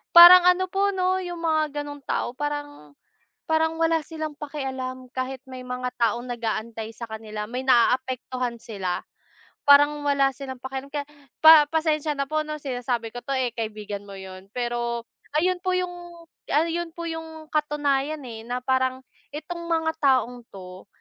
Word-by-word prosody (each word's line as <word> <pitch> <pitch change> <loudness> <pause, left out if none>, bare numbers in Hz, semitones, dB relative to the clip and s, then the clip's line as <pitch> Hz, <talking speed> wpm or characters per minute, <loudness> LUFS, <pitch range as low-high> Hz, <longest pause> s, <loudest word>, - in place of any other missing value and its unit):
parang 350 +1 +12
ano 365 +1 +4
po 400 +1 +2
'no 375 -1 +1
yung 350 -1 -5
mga 310 -2 0
ganung 290 0 -8
tao - - -1
parang 290 - -5 0.5
parang 320 0 +1
wala 325 -1 +2
silang 315 -1 -5
pakialam 265 -3 -5
kahit 260 0 -3
may 255 -1 -8
mga 250 0 -4
taong 240 +1 0
nag-aantay 225 -1 -3
sa 235 +1 -8
kanila, 215 -1 -6
may 250 +2 -3
naaapektuhan 255 0 +1
sila. 195 -6 -3 0.7
Parang 290 +1 +7
wala 280 -1 +3
silang 260 0 -7
pakialam 265 +1 -6
kaya 290 -1 -3 0.4
pa 315 -2 +10
pasensya 310 -1 0
na 275 - 0
po 310 +2 -1
'no 305 0 -4
sinasabi 245 -4 -3
ko 245 - -5
to 275 - -3
eh 255 -2 0
kaibigan 215 -3 -5
mo 195 - -9
yun, 190 0 -10
pero 240 0 -2 0.3
ayun 360 +3 +2
po 370 0 0
yung, 365 -1 -1 0.6
ayun 330 +2 0
po 340 - -6
yung 320 -1 -7
katunayan 295 -1 0
eh, 225 -2 -9
na 250 +1 -3
parang 260 0 0 0.3
itong 340 +3 -6
mga 325 -1 +1
taong 250 -4 +2
'to 185 -1 -11
270 Hz, 155 wpm, -25 LUFS, 240-315 Hz, 0.7 s, parang